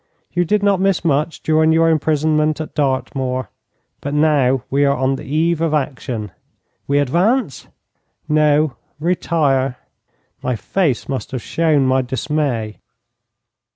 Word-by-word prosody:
You 175 0 +1
did 210 +4 +1
not 200 -2 +2
miss 195 -3 +1
much 155 +1 0
during 160 0 +3
your 165 +1 +4
imprisonment 155 0 +1
at 155 - -6
Dartmoor. 130 -3 -1 0.5
But 145 +1 -4
now 140 -4 +2
we 140 +1 +2
are 140 0 +2
on 130 +1 +1
the - - -9
eve 160 +3 0
of 160 -2 +1
action.' 125 -7 -3 0.6
'We 140 - +2
advance?' 175 - +1 0.6
'No, 150 -3 +2 0.2
retire.' 145 -6 0 0.6
My 125 - -1
face 145 - -1
must 135 -1 -4
have 130 -2 -4
shown 155 -4 +1
my 130 0 +3
dismay. 130 -4 -2
150 Hz, 130 wpm, -19 LUFS, 130-160 Hz, 0.6 s, your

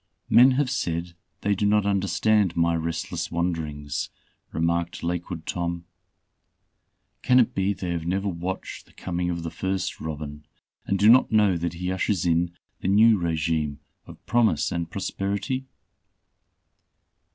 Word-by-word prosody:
"Men 130 +2 +7
have 130 -1 +1
said 85 -7 -2 0.3
they 105 - +2
do 100 +1 +1
not 105 0 +3
understand 100 -1 +2
my 85 0 +3
restless 85 0 -3
wanderings," 80 -4 -2 0.4
remarked 85 +1 -1
Lakewood 85 -1 -3
Tom. 85 -1 -3 1.4
"Can 125 0 +5
it 120 - +3
be 95 +1 +1
they 90 -3 -4
have 85 -1 -3
never 95 +3 0
watched 90 0 -5
the - - -22
coming 90 -1 -3
of 85 -1 -3
the 85 - -4
first 95 +1 -2
robin, 75 -1 -6 0.4
and 100 - +1
do 100 - +4
not 125 +4 +6
know 105 -4 +4
that 85 0 -2
he 90 +2 -3
ushers 95 -1 0
in 85 0 +2 0.3
the - - -3
new 105 +2 +5
regime 80 -3 -1 0.3
of - - -13
promise 115 -10 +2
and 85 -1 -2
prosperity? 100 +6 -3
90 Hz, 140 wpm, -25 LUFS, 85-100 Hz, 1.4 s, Men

